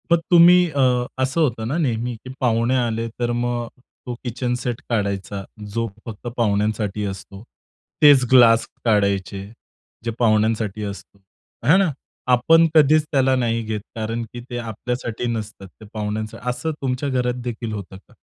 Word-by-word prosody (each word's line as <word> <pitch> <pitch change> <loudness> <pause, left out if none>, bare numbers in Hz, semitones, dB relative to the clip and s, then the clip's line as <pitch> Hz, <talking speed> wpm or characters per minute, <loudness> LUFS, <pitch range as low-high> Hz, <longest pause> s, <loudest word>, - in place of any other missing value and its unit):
मग 170 - +5
तुम्ही 175 +1 +7
अ, 125 -3 +2 0.2
असं 135 +6 0
होतं 120 -7 0
ना 140 +7 -1
नेहमी, 120 -6 -1
की 115 +3 -12
पाहुणे 120 0 +2
आले 115 -2 -1
तर 120 0 0
मग 120 0 -1 0.4
तो 125 - -4
किचन 125 0 -2
सेट 120 -2 -3
काढायचा 100 -3 -2 0.3
जो 115 +1 -1 0.2
फक्त 115 +1 -8
पाहुण्यांसाठी 105 -1 0
असतो. 100 +1 -7 0.6
तेच 145 -3 +7
ग्लास 115 -3 +6 0.2
काढायचे 100 -2 +1 0.6
जे 115 - -1
पाहुण्यांसाठी 110 -2 +1
असतो. 100 0 -8 0.5
हा 155 - +7
ना, 190 -5 +2 0.4
आपण 165 +7 +5
कधीच 155 0 +6
त्याला 135 -2 +3
नाही 115 -2 0
घेत 110 -1 -3
कारण 115 +1 -3
की 120 - -6
ते 120 - -4
आपल्यासाठी 120 +1 -4
नसतात, 110 -3 -6
ते 110 +4 -16
पाहुण्यांसाठी. 110 +2 -4
असं 160 +6 -2
तुमच्या 130 +1 -1
घरातदेखील 125 -3 -2
होतं 100 -2 -7
का? 95 - -22
115 Hz, 150 wpm, -21 LUFS, 110-125 Hz, 0.6 s, तुम्ही